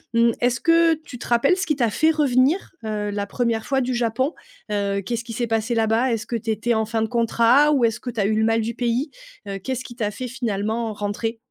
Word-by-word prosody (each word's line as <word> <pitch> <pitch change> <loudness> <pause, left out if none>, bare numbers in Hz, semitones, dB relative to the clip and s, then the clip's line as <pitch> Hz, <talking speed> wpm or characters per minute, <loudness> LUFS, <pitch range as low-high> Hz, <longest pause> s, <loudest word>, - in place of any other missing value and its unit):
Mmh, 230 0 +5
est-ce 240 0 +2
que 330 -1 +4
tu 295 -6 -11
te - - -7
rappelles 245 +8 +3
ce 380 +1 -3
qui 305 - +1
t'a 240 -5 +1
fait 315 +8 +3
revenir 295 +2 +2
heu, 210 -1 -2
la 205 0 -3
1re 230 0 -1
fois 270 -1 +1
du 255 +1 -1
Japon? 240 +5 0 0.4
Heu, 200 -1 0
qu'est-ce 235 +1 -2
qui 230 -1 -8
s'est 240 +2 -1
passé 225 +1 0
là-bas? 225 +3 +2
Est-ce 225 -2 -2
que 240 - -4
tu 230 0 -4
étais 225 +2 0
en 220 -1 +1
fin 225 -1 -1
de - - 0
contrat 235 +5 +3
ou 260 -5 +3
est-ce 225 -1 0
que 250 - -6
tu 235 -2 -5
as 200 - +2
eu 215 - +1
le 220 - +2
mal 225 0 +2
du 225 +2 -3
pays? 245 +5 -1 0.4
Heu, 195 -1 -4
qu'est-ce 260 +5 -4
qui 240 - -10
t'a 220 -4 -1
fait 250 +5 -6
finalement 225 -2 -2
rentrer? 210 +3 -3
235 Hz, 250 wpm, -22 LUFS, 220-255 Hz, 0.4 s, Mmh